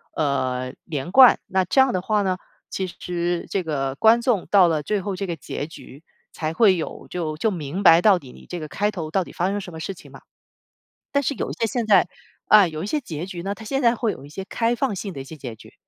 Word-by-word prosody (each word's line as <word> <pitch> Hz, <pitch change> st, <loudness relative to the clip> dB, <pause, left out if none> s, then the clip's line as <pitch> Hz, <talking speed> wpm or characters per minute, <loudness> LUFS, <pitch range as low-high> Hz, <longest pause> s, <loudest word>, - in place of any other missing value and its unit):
呃， 130 Hz, -4 st, -1 dB
连 160 Hz, +1 st, -4 dB
贯， 255 Hz, +2 st, +8 dB
那 190 Hz, 0 st, +1 dB
这 225 Hz, -, +1 dB
样 265 Hz, -1 st, +3 dB
的 185 Hz, -, 0 dB
话 210 Hz, +2 st, +1 dB
呢， 185 Hz, -1 st, 0 dB, 0.3 s
其 190 Hz, -1 st, -3 dB
实 175 Hz, 0 st, -3 dB
这 195 Hz, -, 0 dB
个 140 Hz, -5 st, -2 dB
观 230 Hz, +2 st, +5 dB
众 235 Hz, -7 st, 0 dB
到 195 Hz, -3 st, +6 dB
了 155 Hz, -2 st, 0 dB
最 205 Hz, +6 st, -1 dB
后 195 Hz, 0 st, -3 dB
这 195 Hz, +1 st, -4 dB
个 170 Hz, -, -3 dB
结 145 Hz, 0 st, -6 dB
局 155 Hz, -2 st, -13 dB, 0.3 s
才 155 Hz, 0 st, -3 dB
会 190 Hz, 0 st, +4 dB
有， 160 Hz, -, -6 dB
就 160 Hz, -4 st, -3 dB
就 220 Hz, +6 st, +1 dB
明 170 Hz, +2 st, -4 dB
白 165 Hz, -2 st, +7 dB
到 205 Hz, -2 st, +5 dB
底 135 Hz, -7 st, -12 dB
你 -, -, -16 dB
这 175 Hz, -, -5 dB
个 155 Hz, -, -5 dB
开 205 Hz, +6 st, 0 dB
头， 165 Hz, -7 st, -5 dB
到 190 Hz, 0 st, +1 dB
底 -, -, -11 dB
发 180 Hz, -, 0 dB
生 205 Hz, +1 st, -1 dB
什 180 Hz, -, -9 dB
么 160 Hz, -, -8 dB
事 180 Hz, +4 st, -4 dB
情 185 Hz, -, -15 dB
嘛。 -, -, -13 dB, 0.9 s
但 280 Hz, 0 st, +1 dB
是 270 Hz, -, 0 dB
有 -, -, -3 dB
一 -, -, -4 dB
些 230 Hz, -, -1 dB
现 225 Hz, 0 st, -2 dB
在， 195 Hz, -4 st, +5 dB, 0.4 s
啊， 210 Hz, -3 st, +7 dB
有 155 Hz, 0 st, -5 dB
一 -, -, -3 dB
些 300 Hz, -, 0 dB
结 165 Hz, -, -6 dB
局 180 Hz, -2 st, -7 dB
呢， 195 Hz, +3 st, -3 dB
它 220 Hz, -, -11 dB
现 270 Hz, +5 st, -1 dB
在 235 Hz, -1 st, +4 dB
会 230 Hz, -2 st, 0 dB
有 135 Hz, -, -9 dB
一 -, -, -13 dB
些 190 Hz, +6 st, -6 dB
开 230 Hz, +4 st, 0 dB
放 260 Hz, -2 st, -1 dB
性 195 Hz, +1 st, -5 dB
的 135 Hz, -, -6 dB
一 -, -, -7 dB
些 160 Hz, +4 st, -10 dB
结 125 Hz, -5 st, -7 dB
局， -, -, -16 dB
180 Hz, 285 characters per minute, -23 LUFS, 160-210 Hz, 0.9 s, 贯